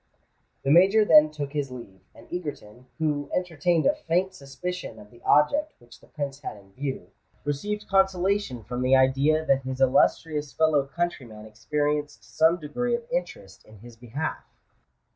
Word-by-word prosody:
The 135 - +1
Major 195 +6 +6
then 155 -4 +7
took 145 -2 -6
his 145 -2 -2
leave; 115 -7 -11
and - - -16
Egerton—who 145 -1 -4
entertained 170 -2 0
a - - +4
faint 180 +3 -1
suspicion 160 -2 -6
of 105 -1 -14
the 120 0 -18
object 290 - +3
which 120 -1 -18
the - - -21
Prince 140 -2 -5
had 135 - -7
in 95 -1 -19
view—received 145 - -5
consolation 190 - +1
from 125 +2 -5
the 130 +1 +4
idea 135 +4 +3
that 135 -2 +2
his 130 0 -5
illustrious 145 +3 +2
fellow 155 -3 +2
countryman 135 -9 -4
experienced 145 +7 -2
some 160 +2 +4
degree 235 +11 -2
of 235 - -5
interest 135 - -5
in 110 - -17
his 120 +3 -14
behalf. 125 +7 -5
145 Hz, 150 wpm, -26 LUFS, 130-175 Hz, -, then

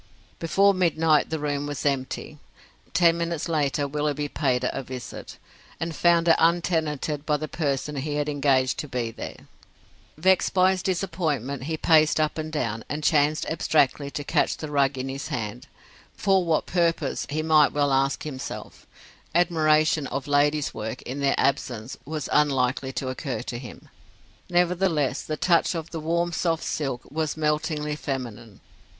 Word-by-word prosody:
Before 195 +5 +3
midnight 165 -4 +2
the 160 - -1
room 145 -1 -2
was 145 -2 -5
empty. 140 +2 -2 0.5
Ten 170 -1 +4
minutes 170 -1 -2
later 145 -3 0
Willoughby 145 0 -1
paid 130 -4 0
it 125 - +1
a 135 - -3
visit, 130 -1 -8 0.4
and 165 -1 -3
found 170 -1 +3
it 165 - +7
untenanted 160 -4 +1
by 150 -1 +1
the 155 +1 -4
person 145 -1 -2
he 145 +2 -2
had 150 0 -1
engaged 135 -3 +1
to 150 - -4
be 125 -4 -2
there. - - -8 0.7
Vexed 185 +4 +2
by 185 0 +5
his 190 -1 -2
disappointment, 160 - -2
he 160 +1 -2
paced 155 -1 +4
up 155 +1 0
and 155 0 -4
down, 115 -7 -2
and 150 +1 -3
chanced 150 0 +2
abstractedly 150 -3 +1
to 145 - -5
catch - - +1
the 155 -2 -6
rug 140 -1 +2
in 130 +1 -3
his 135 +1 -5
hand; 120 +3 -5 0.5
for 195 -2 +2
what 165 -2 +1
purpose, 165 -5 0
he 155 +2 -1
might 155 -2 +5
well 145 -1 +1
ask 135 +1 +1
himself; 135 -4 -7 0.5
admiration 155 -4 +3
of 135 0 -4
ladies' 145 +1 +2
work, 110 +3 -5
in 135 +3 -5
their 140 -1 +2
absence, 125 -3 -1
was 155 0 -4
unlikely 135 -2 +2
to 130 +1 -3
occur 130 -3 -4
to 120 -1 -5
him. 120 -4 -11 0.6
Nevertheless, 175 -4 +1
the 155 - -4
touch 175 +1 +2
of 165 0 -5
the 165 - -4
warm, 170 +2 0
soft 165 -1 0
silk 135 -5 -2
was 155 0 -2
meltingly 150 -1 -1
feminine. 120 -8 -6
150 Hz, 160 wpm, -25 LUFS, 135-160 Hz, 0.7 s, it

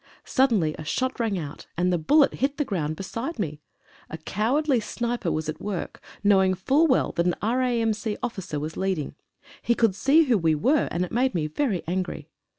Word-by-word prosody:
Suddenly 225 - +2
a - - -5
shot 255 +13 -2
rang 220 -4 0
out, 150 -4 -7
and 180 +1 +2
the 175 - +1
bullet 285 - +4
hit 275 +2 -1
the 295 - 0
ground 155 - -2
beside 230 - -5
me. 150 -8 -4 0.5
A 160 - -6
cowardly 245 - +1
sniper 235 -3 -2
was 155 0 -2
at 155 - -5
work, 200 -4 -5 0.2
knowing 190 -2 +4
full 275 - +3
well 260 - +2
that 170 0 0
an 175 - +1
R.A.M.C. 225 -2 0
officer 190 -10 -3
was 155 +2 -5
leading. 190 -7 -2 0.5
He 235 - +1
could 225 -5 +3
see 280 - +4
who 245 -8 +2
we 160 -2 +2
were, 270 - +2
and 180 +1 -1
it - - -12
made 250 -2 +1
me 160 -3 0
very 195 - -1
angry. 185 +2 -3
205 Hz, 190 wpm, -25 LUFS, 170-255 Hz, 0.5 s, bullet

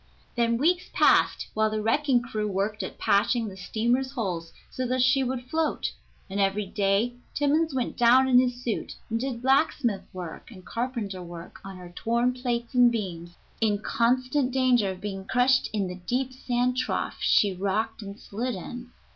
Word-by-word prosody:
Then 235 -1 +1
weeks 355 +7 +1
passed - - +4
while 215 0 +2
the 215 0 -2
wrecking 245 +3 +2
crew 215 -3 -3
worked 205 +2 -1
at - - -6
patching 225 +3 +2
the 195 - -8
steamer's 240 +7 -1
holes 180 -9 -3 0.2
so 255 -1 -3
that 255 0 +1
she 265 +1 +4
would 255 -1 -2
float, 315 +2 -1 0.4
and 195 +1 -4
every 200 +1 +1
day 200 +4 +1 0.2
Timmans 295 +1 +1
went 250 -2 -2
down 250 +2 +5
in 250 -1 +6
his 250 -1 0
suit 230 - -3 0.2
and 225 - 0
did 250 -1 -4
blacksmith 265 -5 +2
work 180 +2 -8
and 185 -6 -13
carpenter 230 -6 -3
work 170 -1 -10
on 195 -1 -8
her 175 -1 -11
torn 235 +4 +1
plates 245 -1 -3
and 245 -1 +6
beams, 175 -6 -5 0.3
in 210 -2 +2
constant 255 +5 +1
danger 250 -5 +3
of 185 -1 -6
being 195 -2 -5
crushed 250 +5 +2
in 210 -3 -1
the 180 0 -6
deep 255 +1 -1
sand 250 -1 0
trough 255 - -2
she 200 -2 +4
rocked 205 +5 -2
and 200 0 -8
slid 240 +3 -4
in. 240 +6 -8
235 Hz, 175 wpm, -26 LUFS, 200-255 Hz, 0.4 s, in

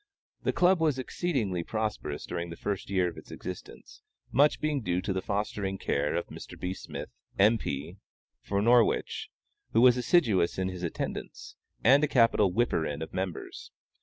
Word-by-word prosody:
The - - +1
Club 180 -1 +3
was 155 -4 +2
exceedingly 125 - -1
prosperous 105 -8 -3
during 85 0 -4
the 85 - -7
first 100 +2 -4
year 95 -2 +2
of 85 - -6
its - - -12
existence, - - -9 0.3
much 145 +4 +4
being 150 -3 0
due 90 -4 0
to 95 +1 -2
the 95 - -1
fostering 100 -1 -2
care 75 -4 0
of - - -1
Mr. - - -10
B. 90 +1 -2
Smith, - - -8 0.3
M. 110 +3 +5
P. 75 +5 -4 0.4
for 100 0 -1
Norwich, 120 0 +3 0.4
who 115 - +5
was 125 0 +7
assiduous 115 - +3
in 95 0 0
his 90 -1 -7
attendance, 285 - -5 0.3
and 140 +3 +6
a - - +4
capital 115 -7 +4
"whipper 110 -5 +1
in" 75 0 -3
of - - -9
members. 95 -2 -5
100 Hz, 170 wpm, -29 LUFS, 90-125 Hz, 0.4 s, was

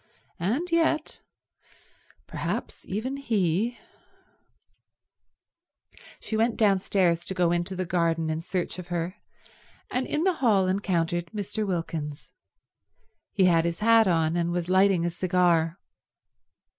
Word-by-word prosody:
And 255 - -1
yet—perhaps 320 -2 -4
even 240 +8 -3
he— 220 -3 0 2.4
She 220 - -4
went 225 +1 +1
downstairs 190 -4 +2
to 190 - -4
go 175 -2 +2
into 175 +2 -1
the 185 0 -2
garden 165 -2 0
in 155 +1 -3
search 180 +1 -3
of 180 - -8
her, 175 +2 -3 0.7
and 255 +1 -1
in 300 - -1
the 375 0 +3
hall 205 -7 +4
encountered 175 -3 0
Mr. 210 +1 -4
Wilkins. 160 -5 -4 1.0
He 195 -3 +3
had 165 -2 +4
his 170 +3 -3
hat 225 0 +5
on, 165 -2 +2
and 170 0 0
was 175 0 -2
lighting 185 -2 +4
a 175 - 0
cigar. 175 -2 +1
185 Hz, 120 wpm, -26 LUFS, 170-215 Hz, 2.4 s, hat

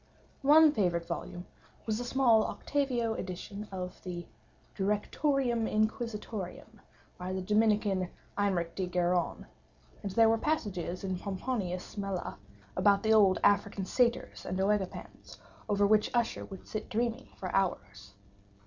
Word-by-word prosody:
One 305 +2 +7
favorite 175 - 0
volume 180 +1 -5 0.4
was 220 0 -1
a - - -2
small 245 -3 +4
octavo 250 -6 -1
edition 200 +2 -6
of 180 -1 -6
the 175 -2 -6 0.5
Directorium 235 +4 +1
Inquisitorium, 215 -2 -3 0.4
by 180 +1 -4
the 190 - -2
Dominican 210 -2 +2 0.3
Eymeric 185 -5 0
de 190 -2 -2
Gironne; 180 0 0 0.6
and 200 - -4
there 225 +2 +6
were 225 0 +3
passages 200 - -2
in 190 -2 -2
Pomponius 190 -2 -3
Mela, 195 - -4 0.4
about 200 -1 +4
the 220 0 +4
old 195 -4 +6
African 200 -1 +2
Satyrs 240 +3 0
and 185 - -3
OEgipans, 195 -1 -2 0.3
over 205 0 +3
which 210 +1 +4
Usher 235 -1 0
would 195 -2 -11
sit 215 -1 -5
dreaming 235 +2 -1
for 185 - -5
hours. 105 - -2
205 Hz, 130 wpm, -31 LUFS, 185-225 Hz, 0.6 s, One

